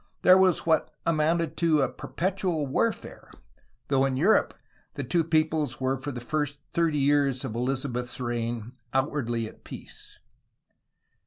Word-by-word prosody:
There 185 - +8
was 190 -2 +3
what 160 -2 +2 0.2
amounted 165 0 +1
to 160 -4 +3
a - - +2
perpetual 180 0 -2
warfare, 130 - -2 0.6
though 135 -1 +2
in 130 -1 -1
Europe 190 +10 +3 0.4
the - - -3
two 170 -2 +1
peoples 155 -5 0
were 130 0 -1
for 145 +2 -4
the 125 - -6
first 145 +3 -2 0.2
thirty 165 -3 +1
years 140 -2 +2
of - - -4
EHzabeth's 125 +1 -2
reign 120 -1 -3 0.2
outwardly 130 -5 0
at - - -15
peace. - - -11
145 Hz, 140 wpm, -27 LUFS, 125-160 Hz, 0.6 s, There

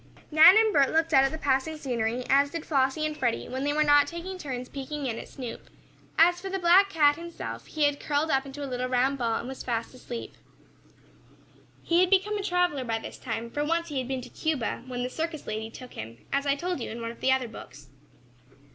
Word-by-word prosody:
Nan 325 +6 +9
and 440 -1 +4
Bert 275 -2 +4
looked 325 +1 +1
out 270 0 +6
at 270 - 0
the 315 - -5
passing 290 +2 0
scenery, 245 -3 -2
as 280 +1 +4
did 330 +1 -6
Flossie 275 +1 +1
and 305 0 -2
Freddie, 245 -5 -1
when 260 +1 -4
they 290 - +1
were 305 +1 +2
not 290 -1 +5
taking 355 +4 -6
turns 255 -6 -5
peeking 280 +2 -5
in 230 -3 -2
at - - -9
Snoop. 250 -4 -8 0.5
As 350 +2 +5
for 390 - -5
the 385 - -2
black 375 +2 +5
cat 295 -5 +4
himself, 340 0 -7
he 310 - -2
had 290 -1 +2
curled 300 +2 0
up 270 0 +2
into 275 +1 -8
a - - -2
little 255 -1 -3
round 260 +2 +1
ball, 230 -2 0
and 235 - -4
was 265 0 -7
fast 230 -1 -3
asleep. 245 -2 -7 1.5
He 340 +1 +2
had 365 0 +4
become 395 +2 +3
a 410 - -2
traveler 355 -7 +1
by 230 -2 -1
this - - -9
time, 230 -1 -4
for 290 - -1
once 335 +2 -1
he 285 -3 -2
had 255 - -4
been 260 -1 -3
to - - -10
Cuba, 290 -7 -2
when 245 -1 -3
the - - -1
circus 320 0 -4
lady 220 +1 -4
took 250 +2 -11
him, 115 +2 -8 0.2
as 280 +1 0
I 280 - +3
told 355 +2 -3
you 235 - -5
in 230 - -6
one 230 0 -4
of 235 - -15
the 265 - +3
other 260 -2 +1
books. 225 - -12
280 Hz, 235 wpm, -27 LUFS, 250-325 Hz, 1.5 s, Nan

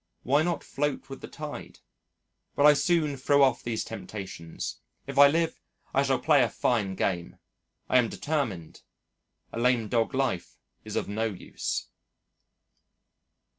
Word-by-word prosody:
Why 140 +4 +3
not 170 +1 -1
float 140 -1 -3
with 135 - -7
the - - -7
tide? 150 -1 -8 0.8
But 145 - +4
I 150 - +9
soon 150 0 +1
throw 140 +2 +4
off 130 -3 +3
these 115 -2 -2
temptations. 95 -7 -7 0.2
If 140 0 -2
I 140 - +10
live, 165 +2 0 0.3
I 135 - +4
shall 135 -2 +2
play 145 +2 +4
a 120 - +2
fine 100 -4 0
game! 90 -2 -2 0.5
I 130 - +5
am 115 -2 +1
determined. 125 - -3 0.7
A - - -3
lame 120 -2 +2
dog 115 +2 +1
life 130 -10 -1 0.3
is - - -7
of - - -1
no 110 +2 -1
use. 105 -5 -4
130 Hz, 145 wpm, -28 LUFS, 110-145 Hz, 0.8 s, I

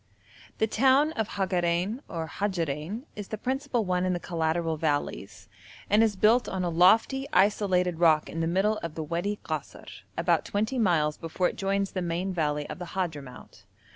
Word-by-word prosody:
The 220 - +2
town 265 +7 +3
of 220 -8 -2
Hagarein 185 +3 0
or 165 -1 -4
Hajarein 175 - -3
is 205 -2 -6
the 215 - -5
principal 260 -1 -1
one 180 -1 0
in 185 0 +1
the 175 - -2
collateral 165 -1 -1
valleys, 145 -11 -3 0.4
and 210 +2 +5
is 220 -2 +2
built 220 +5 +3
on 190 -1 -2
a 175 - -1
lofty 220 +10 +4
isolated 185 -4 +2
rock 160 -3 +4
in 165 - -5
the 165 - 0
middle 195 +5 +1
of 165 -2 -6
the 160 - -3
Wadi 175 +6 -2
Kasr, 155 -3 -6 0.2
about 170 -1 +2
twenty 220 +5 -1
miles 160 -8 +2
before 165 +2 -1
it - - -9
joins 195 0 -1
the 185 - -3
main 175 +2 -2
valley 150 -3 -1
of - - -7
the 175 -1 -8
Hadhramout. 150 -8 -5
180 Hz, 175 wpm, -27 LUFS, 165-210 Hz, 0.4 s, and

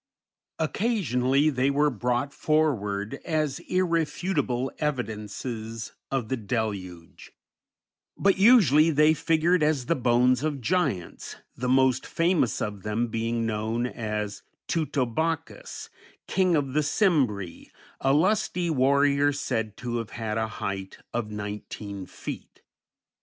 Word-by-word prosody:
Occasionally 155 - +1
they 130 0 +1
were 145 +1 +2
brought 125 +4 -1
forward 110 -10 0
as 155 -4 -1
irrefutable 165 -7 0
evidences 115 -4 -4 0.2
of 130 -5 -1
the 130 - -1
deluge; 100 -6 -4 0.9
but 195 -1 +3
usually 180 - +6
they 150 0 +5
figured 165 +3 +2
as 150 -4 +1
the 170 - +1
bones 125 -1 +3
of 150 -2 -1
giants, 125 - -1 0.2
the 125 +1 -2
most 130 0 +3
famous 165 -7 +1
of 105 -2 -5
them 110 +4 -1
being 115 +1 -1
known 110 +2 -1
as 105 -4 -4 0.3
Teutobochus, 160 - -2 0.3
King 185 -3 +2
of 140 -4 -1
the 150 - +3
Cimbri, 135 - 0 0.3
a 135 - +2
lusty 180 +2 +2
warrior 140 +1 +3
said 115 -7 -3
to 120 -1 -3
have 115 -2 -4
had 110 -2 -4
a 110 -1 0
height 95 -1 -4 0.2
of 120 -3 -2
nineteen 105 -1 -6
feet. - - -8
130 Hz, 115 wpm, -26 LUFS, 110-155 Hz, 0.9 s, usually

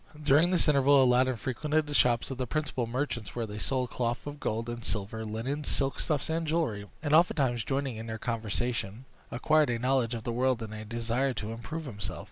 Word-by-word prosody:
During 150 +3 +4
this 180 -2 +3
interval, 140 -1 +5
Aladdin 130 0 +3
frequented 150 +7 -1
the 145 - -6
shops 120 -2 +3
of 130 - -5
the 130 - -1
principal 130 -4 -2
merchants, 120 -4 -3
where 120 -2 -1
they 105 0 -7
sold 130 0 -1
cloth 120 -1 -2
of 145 0 -6
gold 115 -1 -2
and 120 0 -5
silver, 110 +2 -3
linens, 125 +8 -3
silk 135 -1 0
stuffs, 150 -3 0
and 160 0 -1
jewelry, 145 -11 -1 0.2
and 145 -1 0
oftentimes 140 -8 +3
joining 135 -3 -2
in 110 +1 -6
their 110 0 -4
conversation, 115 0 -2 0.2
acquired 150 +4 +3
a 120 - 0
knowledge 125 -1 +1
of 115 - -6
the 120 - -2
world 125 -1 +1
and 110 -1 -7
a 110 0 -7
desire 120 +4 -1
to 110 +1 -4
improve 155 +8 -6
himself. 100 -7 -5
125 Hz, 205 wpm, -29 LUFS, 115-145 Hz, 0.2 s, interval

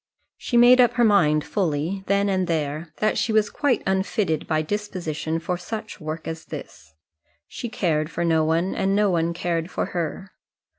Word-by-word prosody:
She 240 - -1
made 245 +1 +7
up 245 - +4
her 240 - +2
mind 155 -9 +4
fully, 180 0 -2
then 200 +1 +2
and 185 -2 0
there, 155 0 -2
that 215 - +1
she 230 - 0
was 215 -1 +2
quite 280 -6 0
unfitted 190 -3 0
by 155 -1 +1
disposition 165 -4 -3
for 175 +2 -3
such 215 +3 -7
work 155 +1 -5
as 160 0 -6
this. - - -10 0.5
She 240 - -6
cared 160 -9 0
for 170 +1 -2
no 160 -1 +3
one, 165 +4 +1
and 195 +1 0
no 205 -1 +3
one 165 -1 +1
cared 170 0 -2
for - - -2
her. 180 +3 -4
180 Hz, 180 wpm, -23 LUFS, 160-205 Hz, 0.5 s, made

